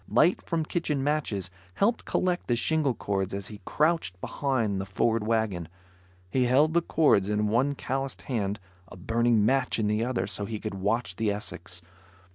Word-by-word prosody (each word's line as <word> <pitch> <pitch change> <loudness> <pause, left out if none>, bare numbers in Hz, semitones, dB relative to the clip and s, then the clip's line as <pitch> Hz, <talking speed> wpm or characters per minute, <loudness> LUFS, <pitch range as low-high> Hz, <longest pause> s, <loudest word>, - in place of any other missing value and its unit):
Light 175 +4 +4
from 165 -2 -2
kitchen 150 -5 -1
matches 125 - -1 0.2
helped 225 +4 +1
collect 180 -1 0
the 120 - +2
shingle 145 0 +1
cords 95 -1 -2
as 100 0 -5
he 105 -2 -10
crouched 155 - +1
behind 115 -6 -1
the - - -4
Ford 110 +2 0
wagon. 110 -7 0 0.6
He 130 -1 +2
held 145 +6 +4
the 170 - +4
cords 125 - +3
in 105 0 +1
one 130 +6 +2
calloused 135 0 -3
hand, 105 -5 -2 0.3
a 90 - -12
burning 115 +3 +2
match 130 +1 +2
in 110 - 0
the 105 +2 +1
other 125 -2 -1
so 100 +1 -2
he 110 0 -4
could 110 -1 -4
watch 100 0 -1
the 110 -1 +1
Essex. 95 -3 -6
115 Hz, 175 wpm, -27 LUFS, 100-140 Hz, 0.6 s, Light